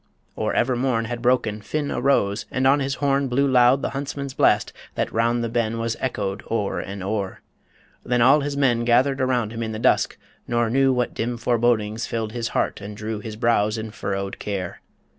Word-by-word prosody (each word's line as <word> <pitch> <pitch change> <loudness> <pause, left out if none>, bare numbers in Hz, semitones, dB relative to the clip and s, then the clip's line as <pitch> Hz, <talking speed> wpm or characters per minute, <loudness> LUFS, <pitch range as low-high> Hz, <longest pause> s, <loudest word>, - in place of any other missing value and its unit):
Or - - -1
ever 125 +1 +2
morn 120 -2 0
Had 120 0 -5
broken, 120 -4 +1
Finn 145 +6 -3
arose, 105 -7 +1
and 130 +1 -1
on 140 +2 +5
his 135 0 -1
horn 140 -1 +1
Blew 135 +3 +2
loud 125 +1 +4
the - - -1
huntsman's 140 0 -4
blast - - +2 0.2
that - - -2
round 115 +1 +1
the - - 0
ben 115 -1 -1
Was 115 0 -1
echoed 100 -6 -2
o'er 105 -3 -1
and 100 -1 -6
o'er... 100 -1 -3 0.6
Then 125 0 0
all 130 +5 +6
his 140 0 -3
men 120 -4 +2
Gathered 130 +3 +3
about 125 -4 +1
him 115 0 -5
in 110 -1 -3
the - - -4
dusk, 110 - +2 0.3
nor 120 -1 +1
knew 135 +1 +4
What 125 -1 0
dim 120 +1 -2
forebodings 115 -2 +1
filled 110 -2 -3
his 115 0 -3
heart - - -1
and 100 +1 -8
drew 110 0 -4
His 105 0 -7
brows 110 -1 +2
in 110 -1 -5
furrowed 100 -1 -4
care. 95 -4 -4
120 Hz, 200 wpm, -23 LUFS, 110-130 Hz, 0.6 s, all